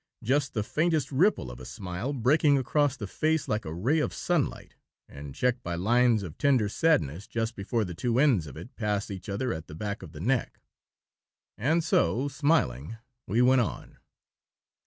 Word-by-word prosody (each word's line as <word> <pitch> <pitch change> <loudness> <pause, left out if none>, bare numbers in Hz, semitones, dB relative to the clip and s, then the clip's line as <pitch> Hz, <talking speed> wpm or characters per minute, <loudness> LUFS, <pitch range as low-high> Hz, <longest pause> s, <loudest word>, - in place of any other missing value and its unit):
Just 135 +3 0
the 105 - 0
faintest 155 +4 0
ripple 145 - +2
of - - -10
a - - -9
smile 90 - -5
breaking 140 +3 +3
across 145 0 +1
the 105 - -5
face 155 +8 0
like 105 0 -1
a 80 - -5
ray 120 - +1
of 150 - -1
sunlight, 175 -6 -1 0.3
and 70 -1 -10
checked 125 0 0
by 85 -5 -4
lines 115 +4 +3
of 85 -5 -9
tender 130 -7 +3
sadness 95 - +1
just 115 0 -2
before 110 +3 -1
the 90 - -6
two 115 +7 -1
ends 125 - +3
of 70 - -10
it 115 - -10
pass 105 -2 -2
each 95 +2 -7
other 115 +5 -1
at 80 0 -7
the 75 - -9
back 100 +4 -4
of 90 -5 -10
the 75 - -10
neck. 120 +7 -1 1.0
And 160 +9 +1
so, 145 - +2
smiling, 130 - 0 0.3
we 115 +6 +2
went 130 0 +5
on. 115 - -5
115 Hz, 180 wpm, -28 LUFS, 95-140 Hz, 1.0 s, went